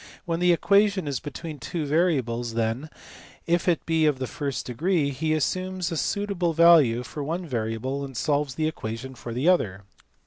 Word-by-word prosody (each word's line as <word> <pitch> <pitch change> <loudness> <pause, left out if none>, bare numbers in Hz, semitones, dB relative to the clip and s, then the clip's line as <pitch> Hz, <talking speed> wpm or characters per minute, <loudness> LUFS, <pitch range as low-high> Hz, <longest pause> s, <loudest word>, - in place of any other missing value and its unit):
When 165 -1 -1
the 180 0 +4
equation 200 0 +3
is 140 -4 -2
between 150 +2 -7
two 155 +6 -3
variables, 130 -8 0
then, 115 +6 -1 0.6
if 170 +1 +1
it 175 -2 +1
be 160 -1 +2
of 145 -3 +2
the 130 - -3
first 140 +1 -4
degree, 150 +3 0
he 155 +4 -2
assumes 185 +4 -1
a - - -2
suitable 185 -1 -1
value 155 -8 +6
for 140 +6 -6
one 170 +5 -3
variable 125 +1 -3
and 135 -3 -7
solves 145 -1 0
the 155 +1 0
equation 125 -3 -5
for 120 -1 -8
the 125 +7 -1
other. 105 - +2
150 Hz, 175 wpm, -25 LUFS, 125-170 Hz, 0.6 s, value